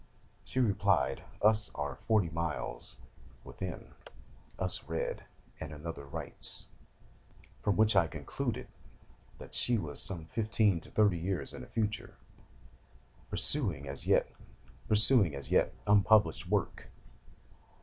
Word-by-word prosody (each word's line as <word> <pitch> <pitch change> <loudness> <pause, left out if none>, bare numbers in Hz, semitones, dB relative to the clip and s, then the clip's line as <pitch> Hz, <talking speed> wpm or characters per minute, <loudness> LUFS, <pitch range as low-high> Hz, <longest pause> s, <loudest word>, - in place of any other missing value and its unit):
She 130 - -4
replied: 100 - +2 0.2
"Us 110 0 +4
are - - -4
forty 110 -4 +4
five 80 - -7
miles 80 -1 -4 0.5
within: - - -7 0.6
us 95 -2 -1
read, 80 0 -3 0.3
and 80 -2 -6
another 75 0 -7
writes"; 70 - -2 1.0
from 100 - 0
which 110 -1 +4
I 90 -4 +5
concluded 75 -3 -4 0.7
that - - -12
she 120 -1 +2
was 75 -8 -1
some 85 -4 0
fifteen 105 -1 +1
to - - -4
thirty 100 -5 +2
years 90 0 -3
in - - -8
the - - -10
future, 105 -2 -3 1.1
perusing 100 - +3
an 70 - -8
as 95 - +1
yet - - +4 0.2
unpublished 105 +1 +4
work. - - -1
95 Hz, 115 wpm, -31 LUFS, 80-110 Hz, 1.1 s, I